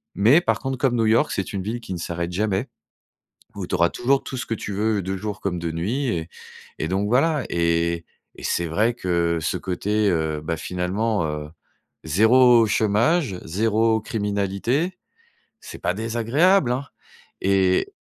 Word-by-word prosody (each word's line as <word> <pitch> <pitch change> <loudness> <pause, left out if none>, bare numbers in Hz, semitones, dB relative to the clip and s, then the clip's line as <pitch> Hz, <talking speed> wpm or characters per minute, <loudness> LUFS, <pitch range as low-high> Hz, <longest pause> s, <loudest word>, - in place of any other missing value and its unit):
Mais 120 +11 +5
par - - 0
contre, 135 -1 -3
comme 130 -1 +1
New 115 -1 +2
York, 110 +2 +3
c'est 100 0 -3
une 95 -2 -3
ville 110 +5 -3
qui 115 - -7
ne 85 - -5
s'arrête 85 +1 -3
jamais. 100 +5 -1 0.9
Où 100 -3 -5
tu - - -3
auras 85 0 +3
toujours 135 +3 +1
tout 130 - -6
ce 130 - -3
que 115 - -2
tu 100 -1 -6
veux 105 +1 0
de 95 +2 -3
jour 105 +1 -5
comme 90 -3 -2
de 85 -1 -3
nuit 110 - -2
et 85 -7 -2 0.5
et 80 - -2
donc 100 +3 0
voilà 140 +3 +2
et 85 0 0 0.3
et - - -12
c'est 85 - -1
vrai 105 +9 +1
que 85 -5 0
ce - - -1
côté, 105 +3 -1
heu, 80 -2 -1
bah 80 +1 -2
finalement, 90 +4 -1
heu, 75 0 -5 0.5
0 115 +8 +5
chômage, 110 - +1
0 110 +4 +1
criminalité, 105 - -1 0.6
c'est - - -9
pas - - 0
désagréable 120 - +2
hein! 135 +3 -3 0.6
Et 95 -1 +2
105 Hz, 170 wpm, -23 LUFS, 90-120 Hz, 0.9 s, Mais